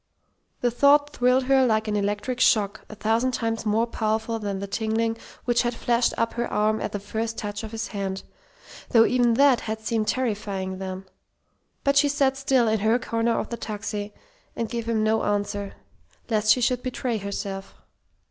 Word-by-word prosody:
The 245 - +2
thought 285 +4 +4
thrilled 250 -1 +2
her 265 0 +4
like 220 -3 +1
an 210 - -1
electric 205 +5 -1
shock 215 -6 +2
a 215 - -8
thousand 225 +4 +1
times 225 -2 -2
more 220 +2 +2
powerful 220 0 -1
than 200 -2 -3
the 200 - -4
tingling 225 +2 -1 0.3
which 240 -1 +3
had 240 0 -1
flashed 240 0 +1
up 230 0 0
her 235 0 -3
arm 215 +1 +1
at - - -3
the 205 - -3
first 220 +3 -4
touch 205 +1 -4
of 220 - -5
his 225 0 -4
hand, 195 -2 -4 0.7
though 225 -1 +6
even 245 -2 +3
that 275 -2 +5
had 220 0 -4
seemed 220 -1 -1
terrifying 200 -6 -2
then. 190 0 -5 0.8
But 280 -1 +2
she 290 +1 +5
sat 275 -2 +2
still 270 -3 +2
in 220 0 +2
her 220 +3 +3
corner 230 -1 0
of - - -3
the 235 - -4
taxi, 210 -1 -5 0.4
and 230 - -2
gave 230 0 -4
him 220 -2 +1
no 220 +1 +2
answer, 205 -1 -2 0.6
lest 215 -1 +3
she 250 - -2
should 250 +1 +1
betray 250 -2 -2
herself. 200 -1 -5
225 Hz, 185 wpm, -25 LUFS, 210-245 Hz, 0.8 s, though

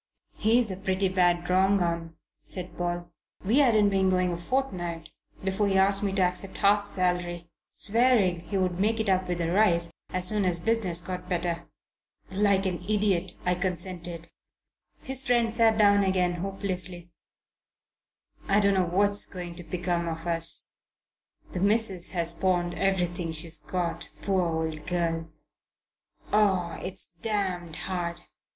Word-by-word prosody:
"He's 225 0 +2
a 185 - -5
pretty 190 0 0
bad 175 -2 +1
wrong 190 +2 +3
'un," 170 -2 -2 0.3
said 180 -1 -3
Paul. 175 0 -4 0.3
"We 230 +8 +3
hadn't 220 -7 +4
been 190 -1 +1
going 185 -1 +1
a - - -4
fortnight 175 -7 -3 0.3
before 195 +2 0
he 195 -1 +1
asked 195 +1 +4
me 200 -2 -1
to 195 -1 +2
accept 180 +2 -2
half 205 0 +3
salary, 180 -3 -1 0.2
swearing 220 -5 +2
he 175 +4 -4
would 185 -1 -1
make 220 +3 +1
it 220 -2 -1
up, 185 -1 +1
with 175 -1 -2
a 165 0 -1
rise, 170 -4 +2 0.2
as 180 0 +3
soon 210 +1 +2
as 180 -2 +2
business 185 -3 0
got 180 +1 -7
better. 170 -1 -2 0.6
Like 195 0 +2
an 180 -2 -2
idiot, 195 -4 +1
I 180 - +2
consented." 175 -2 -3 0.7
His 265 0 +1
friend 235 -2 +1
sat 225 -1 +3
down 205 -1 +4
again 185 -2 +1
hopelessly. 185 -2 -2 1.3
"I 200 +1 +3
don't 200 -1 +4
know 185 -2 +1
what's 200 +3 +3
going 175 -2 -7
to 175 - -1
become 175 -1 -2
of 165 0 -5
us. 165 -1 +2 0.7
The 180 - -3
missus 200 -2 +3
has 170 -2 +3
pawned 175 -1 0
everything 175 -3 -1
she 155 +1 +4
has 160 -1 +3
got, 180 -2 -4
poor 195 -2 +1
old 160 -2 -3
girl! 165 -2 -2 1.0
Oh, 190 -5 +1
it's 185 +1 -3 0.2
damned 185 -6 -2
hard! 175 -2 -4
185 Hz, 150 wpm, -27 LUFS, 175-200 Hz, 1.3 s, hadn't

